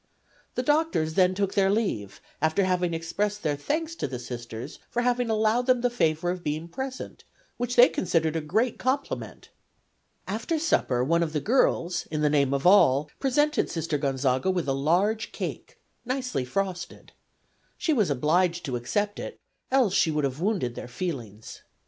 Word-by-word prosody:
The 250 - -1
doctors 295 - +1
then 185 +1 +3
took 195 0 -1
their 195 -1 +3
leave, 195 - -1 0.2
after 160 +5 +2
having 180 -2 +1
expressed 205 +6 -2
their 150 -2 +1
thanks 315 - -2
to - - -2
the 130 -2 -5
Sisters 120 +1 -7
for 240 - -1
having 245 -1 +1
allowed 220 +3 +2
them 255 -2 +4
the 245 0 +1
favor 165 -6 +1
of 180 -1 -5
being 155 +2 -3
present, 260 +7 -6 0.3
which 245 0 -2
they 245 +1 +9
considered 165 -3 0
a 160 - 0
great 220 +11 0
compliment. 270 +2 -3 0.8
After 225 - -2
supper 130 - +1
one 170 +5 +2
of 160 -2 -1
the 150 - +1
girls, 175 - +1
in 155 -1 -2
the 150 -1 +3
name 140 -3 +3
of 140 +2 -1
all, 150 -6 +5
presented 295 +3 +1
Sister 165 -3 -2
Gonzaga 135 +2 0
with 180 -5 0
a 135 - +1
large 180 +11 +1
cake, - - -6 0.3
nicely 255 - -2
frosted. 180 +4 -4 0.7
She 325 - +1
was 215 - +2
obliged 170 +6 +1
to 130 -4 -2
accept 205 - -2
it, - - -7 0.3
else 255 -7 +3
she 170 - +3
would 150 -1 0
have 135 +2 -2
wounded 185 - 0
their 120 - -7
feelings. 120 - -6
180 Hz, 170 wpm, -26 LUFS, 150-230 Hz, 0.8 s, they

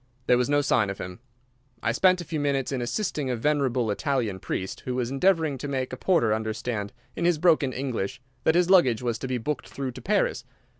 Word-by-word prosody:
There 125 - +5
was 125 - +1
no 145 0 +3
sign 110 -7 +2
of 100 - -4
him. 90 +2 -7 0.6
I 115 - +2
spent 185 +8 +3
a - - -7
few 155 0 -3
minutes 140 -2 0
in 130 -2 -1
assisting 145 - -2
a 125 - 0
venerable 130 -3 +1
Italian 115 -4 -1
priest, 95 +1 -4
who 125 - -4
was 125 -1 -1
endeavouring 160 -2 +2
to 145 - -4
make 130 -2 -2
a - - -1
porter 130 - +2
understand, 110 -1 -3 0.2
in - - -3
his 175 -2 +3
broken 155 -5 +3
English, 130 -2 -3 0.2
that 160 - +3
his 175 0 +4
luggage 130 - +5
was 120 -2 -1
to 130 - -4
be 130 -1 -1
booked 145 +6 -3
through 135 -2 -4
to - - -10
Paris. - - +1
130 Hz, 215 wpm, -26 LUFS, 115-150 Hz, 0.6 s, There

